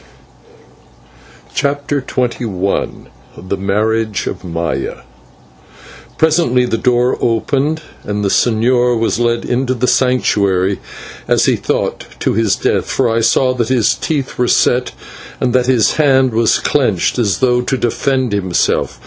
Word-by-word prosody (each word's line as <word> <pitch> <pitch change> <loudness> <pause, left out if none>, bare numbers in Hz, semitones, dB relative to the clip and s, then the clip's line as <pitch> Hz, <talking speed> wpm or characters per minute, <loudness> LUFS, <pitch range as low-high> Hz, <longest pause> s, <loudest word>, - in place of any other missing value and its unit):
CHAPTER 140 +1 -1
XXI 120 -7 -2 0.3
THE 95 +2 -4
MARRIAGE 110 +2 -1
OF - - -5
MAYA 85 -6 -4 1.1
Presently 155 -6 +2
the 115 -2 -2
door 125 +1 +1
opened 140 +7 0 0.2
and 105 0 -3
the - - +1
señor 120 +3 +2
was 115 +1 0
led 120 -1 0
into 130 +1 -1
the 125 +1 -1
Sanctuary, 100 -8 +1 0.5
as - - +3
he - - +3
thought - - -3
to - - 0
his 110 -2 +1
death, - - -1
for 130 - +1
I 115 0 +1
saw 130 +3 +2
that 120 -3 -2
his 115 -4 +2
teeth 140 -6 -3
were 125 - +2
set 125 +1 +2 0.5
and 125 - 0
that 125 -1 +2
his 125 -5 +2
hand 135 -4 +3
was 115 0 +3
clenched 125 -6 0
as 105 -5 +1
though 125 -1 +2
to 130 +2 -1
defend 130 +1 -1
himself. 95 -3 0
120 Hz, 135 wpm, -15 LUFS, 110-130 Hz, 1.1 s, as